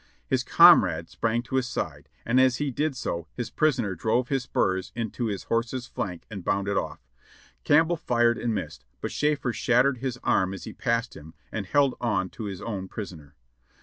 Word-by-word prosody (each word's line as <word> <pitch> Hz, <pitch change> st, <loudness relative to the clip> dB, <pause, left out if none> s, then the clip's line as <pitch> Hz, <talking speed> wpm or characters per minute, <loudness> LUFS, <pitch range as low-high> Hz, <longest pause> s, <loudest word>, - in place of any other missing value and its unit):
His -, -, 0 dB
comrade 80 Hz, +1 st, +6 dB
sprang 115 Hz, +1 st, -1 dB
to 130 Hz, +3 st, -2 dB
his 130 Hz, -2 st, 0 dB
side, -, -, -4 dB, 0.2 s
and 125 Hz, +3 st, +4 dB
as 130 Hz, -1 st, +4 dB
he 145 Hz, -2 st, -1 dB
did 150 Hz, +2 st, -1 dB
so 85 Hz, -9 st, -4 dB
his 120 Hz, -, -4 dB
prisoner 125 Hz, -10 st, +1 dB
drove 110 Hz, +8 st, 0 dB
his 135 Hz, -2 st, +1 dB
spurs 95 Hz, -5 st, 0 dB
into 115 Hz, +1 st, -3 dB
his 100 Hz, -3 st, -3 dB
horse's 115 Hz, +2 st, -1 dB
flank 90 Hz, -7 st, -5 dB
and 100 Hz, -5 st, -7 dB
bounded 100 Hz, +2 st, 0 dB
off. -, -, -3 dB, 0.6 s
Campbell 160 Hz, +3 st, +4 dB
fired 120 Hz, -5 st, +2 dB
and 120 Hz, -, -1 dB
missed, 80 Hz, -6 st, -5 dB, 0.2 s
but -, -, -4 dB
Schafer 150 Hz, -5 st, 0 dB
shattered 125 Hz, +2 st, +2 dB
his 130 Hz, -1 st, -3 dB
arm 95 Hz, +1 st, +2 dB
as 95 Hz, -, -9 dB
he -, -, -7 dB
passed 115 Hz, -1 st, -1 dB
him, 80 Hz, +2 st, -12 dB, 0.2 s
and 100 Hz, -4 st, -4 dB
held 140 Hz, +3 st, +3 dB
on 105 Hz, -6 st, 0 dB
to 110 Hz, -, -7 dB
his 95 Hz, -2 st, -6 dB
own 100 Hz, -4 st, -4 dB
prisoner. 80 Hz, -9 st, -8 dB
115 Hz, 185 wpm, -26 LUFS, 95-130 Hz, 0.6 s, comrade